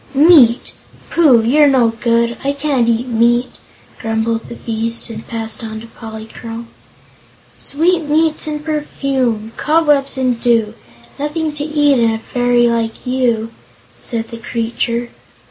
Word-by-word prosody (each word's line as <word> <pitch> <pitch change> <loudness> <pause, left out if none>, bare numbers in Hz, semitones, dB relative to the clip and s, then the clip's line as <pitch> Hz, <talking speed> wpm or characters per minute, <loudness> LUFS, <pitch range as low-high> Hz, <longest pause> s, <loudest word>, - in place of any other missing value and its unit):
"Meat! 275 -6 +5 0.4
Pooh, 275 -9 +5
you're 290 +6 +4
no 255 -4 +4
good! 235 +1 0
I 280 +1 0
can't 280 -5 0
eat 235 +1 +1
meat," 240 +1 +2 0.5
grumbled 225 0 -2
the - - -7
beast, 230 +1 -3
and 220 0 -9
passed 225 -1 -5
on 220 -1 -6
to 225 - -10
Polychrome. 225 +1 -9 0.9
"Sweetmeats 320 0 +1
and 300 0 -4
perfume 265 -7 -2
cobwebs 295 -4 +2
and 255 -3 0
dew! 230 -3 +2 0.5
Nothing 300 +1 -2
to 295 -1 -4
eat 295 -3 +2
in 230 -1 +3
a 225 - -1
fairy 245 +1 +1
like 230 0 -2
you," 240 -3 0 0.5
said 225 -2 -5
the 230 - -6
creature. 235 +1 -2
240 Hz, 130 wpm, -16 LUFS, 230-290 Hz, 0.9 s, Meat